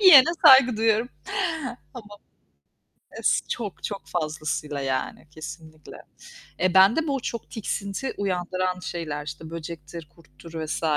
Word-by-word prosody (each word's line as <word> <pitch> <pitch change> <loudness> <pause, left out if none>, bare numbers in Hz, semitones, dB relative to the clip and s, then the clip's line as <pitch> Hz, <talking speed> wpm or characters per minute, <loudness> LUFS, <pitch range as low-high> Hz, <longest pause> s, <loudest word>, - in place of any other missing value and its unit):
Yiyene 330 -7 +9 0.2
saygı 255 -3 +8
duyuyorum. 225 +1 +2 0.9
Tamam, 205 -3 -11 1.0
es - - +2
çok 210 -6 -4
çok 200 - -5
fazlasıyla, 155 -3 -3
yani, 135 +3 -3
kesinlikle. 155 0 -10 0.7
Eee, 185 0 +2
bende 210 +13 +6
bu 275 -2 0
çok 235 -1 -5
tiksinti 210 +3 -3
uyandıran 185 -1 -1
şeyler 155 -5 -5
işte 155 +1 -7
böcektir, 165 -1 -8
kurttur 165 +1 -16
vs. 155 - -3
175 Hz, 115 wpm, -25 LUFS, 155-215 Hz, 1.0 s, Yiyene